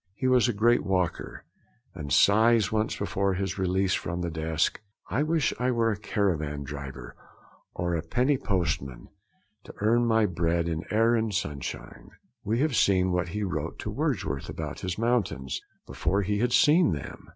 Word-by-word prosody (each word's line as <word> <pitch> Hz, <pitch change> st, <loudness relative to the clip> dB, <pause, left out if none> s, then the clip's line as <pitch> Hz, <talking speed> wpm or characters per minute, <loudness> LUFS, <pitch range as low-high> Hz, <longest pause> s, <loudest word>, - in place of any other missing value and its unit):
He 130 Hz, -, -4 dB
was 130 Hz, -1 st, +4 dB
a -, -, +2 dB
great 120 Hz, +4 st, +3 dB
walker, 90 Hz, -3 st, -2 dB, 0.5 s
and 75 Hz, -6 st, -7 dB
sighs 110 Hz, -, +4 dB
once, 110 Hz, 0 st, 0 dB
before 100 Hz, -1 st, -1 dB
his 95 Hz, +1 st, -3 dB
release 95 Hz, 0 st, +1 dB
from 85 Hz, +1 st, -2 dB
the 85 Hz, -1 st, -2 dB
desk: 80 Hz, +2 st, -1 dB, 0.3 s
'I 130 Hz, -, +1 dB
wish 155 Hz, 0 st, +1 dB
I 125 Hz, +1 st, +1 dB
were 115 Hz, -2 st, +2 dB
a -, -, -1 dB
caravan 80 Hz, -9 st, -1 dB
driver 70 Hz, -3 st, -8 dB, 0.6 s
or 85 Hz, 0 st, -1 dB
a 85 Hz, -, 0 dB
penny 125 Hz, -, +1 dB
post 90 Hz, -, 0 dB
man, 65 Hz, -3 st, -10 dB, 0.6 s
to -, -, -11 dB
earn 115 Hz, +3 st, +2 dB
my 110 Hz, -1 st, +3 dB
bread 85 Hz, -2 st, 0 dB
in 80 Hz, -1 st, -2 dB
air 115 Hz, +2 st, +3 dB
and 110 Hz, -2 st, 0 dB
sunshine.' 75 Hz, -10 st, -5 dB, 0.3 s
We 115 Hz, +5 st, 0 dB
have 150 Hz, -4 st, +1 dB
seen 95 Hz, -3 st, +3 dB
what 90 Hz, 0 st, 0 dB
he 105 Hz, +4 st, -3 dB
wrote 90 Hz, -3 st, -3 dB
to -, -, -5 dB
Wordsworth 65 Hz, -, -2 dB
about -, -, -5 dB
his 90 Hz, -2 st, -4 dB
mountains, 110 Hz, -, -1 dB, 0.2 s
before 100 Hz, +4 st, -1 dB
he 105 Hz, +2 st, -1 dB
had 120 Hz, +2 st, +1 dB
seen 150 Hz, -, +5 dB
them. 70 Hz, -3 st, -8 dB
95 Hz, 175 wpm, -27 LUFS, 85-115 Hz, 0.6 s, seen